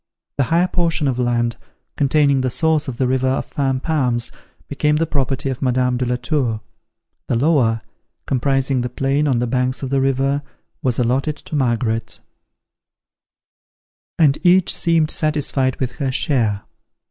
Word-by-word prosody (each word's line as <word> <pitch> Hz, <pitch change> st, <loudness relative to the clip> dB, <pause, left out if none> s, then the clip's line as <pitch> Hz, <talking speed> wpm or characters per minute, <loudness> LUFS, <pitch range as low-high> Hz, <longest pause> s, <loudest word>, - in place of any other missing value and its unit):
The 140 Hz, -, +2 dB
higher 170 Hz, +7 st, +2 dB
portion 170 Hz, -4 st, 0 dB
of 130 Hz, -2 st, -1 dB
land, 120 Hz, -1 st, 0 dB, 0.4 s
containing 140 Hz, -1 st, +3 dB
the 130 Hz, -, 0 dB
source 160 Hz, +3 st, +1 dB
of 125 Hz, -3 st, -5 dB
the 130 Hz, -, +1 dB
river 130 Hz, 0 st, +1 dB
of 130 Hz, -, 0 dB
Fan 135 Hz, -2 st, -1 dB
Palms, 125 Hz, -7 st, 0 dB, 0.4 s
became 150 Hz, +1 st, +1 dB
the 160 Hz, +2 st, +1 dB
property 140 Hz, -2 st, -1 dB
of 130 Hz, -, -6 dB
Madame 125 Hz, -1 st, +1 dB
de 125 Hz, 0 st, -1 dB
la 125 Hz, -, +1 dB
Tour; 125 Hz, -3 st, -1 dB, 0.7 s
the 125 Hz, -, 0 dB
lower, 120 Hz, -5 st, +2 dB, 0.4 s
comprising 135 Hz, 0 st, +1 dB
the 125 Hz, -, -2 dB
plain 135 Hz, +4 st, 0 dB
on 130 Hz, -4 st, +2 dB
the 120 Hz, -, 0 dB
banks 125 Hz, +2 st, -1 dB
of 135 Hz, -, -4 dB
the 135 Hz, -1 st, +2 dB
river, 135 Hz, +1 st, +1 dB, 0.4 s
was 125 Hz, -3 st, 0 dB
allotted 130 Hz, +5 st, 0 dB
to 155 Hz, -, -7 dB
Margaret; 120 Hz, -4 st, -1 dB, 2.0 s
and 150 Hz, -4 st, +3 dB
each 180 Hz, 0 st, +4 dB
seemed 165 Hz, -2 st, +2 dB
satisfied 145 Hz, -4 st, 0 dB
with 125 Hz, -2 st, -1 dB
her 135 Hz, -3 st, -1 dB
share. 115 Hz, -7 st, 0 dB
135 Hz, 155 wpm, -20 LUFS, 125-150 Hz, 2.0 s, each